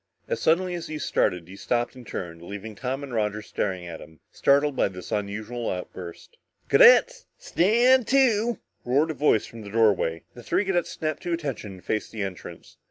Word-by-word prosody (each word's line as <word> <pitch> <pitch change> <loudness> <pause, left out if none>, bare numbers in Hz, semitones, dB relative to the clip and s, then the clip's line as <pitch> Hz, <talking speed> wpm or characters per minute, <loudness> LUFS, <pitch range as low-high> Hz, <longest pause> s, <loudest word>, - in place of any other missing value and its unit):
As 480 - -2
suddenly 180 +3 +2
as 170 -1 -5
he 155 - -5
had 150 - -4
started, 90 -2 0
he 95 - -11
stopped 120 +4 -1
and 125 -3 -12
turned, 85 -4 -6
leaving 100 +5 -7
Tom 130 +6 -4
and 135 -3 -7
Roger 105 -1 -1
staring 95 -4 -3
at 85 -2 -7
him, 80 -2 -14
startled 140 0 +2
by - - +2
this 90 -2 -9
unusual 110 +3 -3
outburst. 90 - -7 0.3
"Cadets - - +6
stand 240 - +3
to!" 240 -4 +3 0.3
roared 145 +6 +2
a - - -4
voice 145 -8 +2
from 115 - -11
the 100 - -9
doorway. 100 -7 +2
The 120 - -11
three 200 - 0
cadets 175 -3 0
snapped 155 -2 -3
to 175 -1 -2
attention 135 - -4
and 90 - -14
faced 110 - -2
the 110 -3 -4
entrance. 95 -2 -8
120 Hz, 190 wpm, -25 LUFS, -, 0.3 s, Cadets